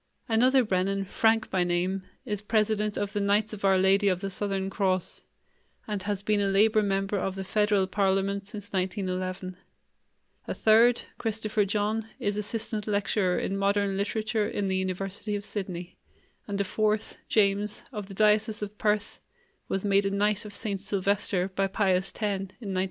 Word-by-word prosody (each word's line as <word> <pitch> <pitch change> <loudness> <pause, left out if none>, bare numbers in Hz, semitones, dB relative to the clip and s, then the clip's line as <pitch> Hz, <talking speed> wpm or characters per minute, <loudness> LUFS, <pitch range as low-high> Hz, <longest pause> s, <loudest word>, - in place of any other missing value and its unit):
Another 255 +4 +4
Brennan, 195 -1 0
Frank 225 +3 +2
by 185 -2 +2
name, 180 +2 0 0.2
is 210 -4 -2
president 215 -1 +1
of 205 0 -2
the 205 - 0
Knights 205 +2 +1
of 205 - -8
Our 195 -1 +5
Lady 195 +2 +4
of 185 -2 +2
the 195 0 -4
Southern 195 0 -1
Cross 190 -2 -1 0.6
and 210 -2 -2
has 200 0 -3
been 210 0 +2
a 200 - +2
labor 215 +3 +4
member 195 0 0
of 190 0 -2
the 195 - -4
federal 205 0 +2
parliament 195 +1 0
since 205 -1 -7
1911; 185 -1 -2 0.9
a - - -2
third, 230 +2 +5 0.2
Christopher 215 -2 0
John, 210 +2 -1
is 205 0 -1
assistant 210 0 -2
lecturer 200 -2 +1
in 195 - -1
modern 200 0 +1
literature 215 +2 0
in 200 -3 -2
the 190 - 0
University 195 +3 -3
of 205 0 -4
Sydney; 180 -5 -6 0.5
and 200 -1 -3
a - - +3
fourth, 215 +2 -1
James, 205 0 +1
of 210 -5 -6
the 195 - -10
diocese 210 +1 +3
of 205 0 -7
Perth, 210 0 0 0.5
was 195 +1 -2
made 200 0 +3
a - - +1
Knight 205 +1 +1
of 210 - -8
St. 200 -4 -3
Silvester 195 -1 0
by 195 +1 0
Pius 190 -1 +1
X. - - -9
in 210 - +2 0.2
1912. 195 -2 -6
200 Hz, 170 wpm, -28 LUFS, 195-210 Hz, 0.9 s, Our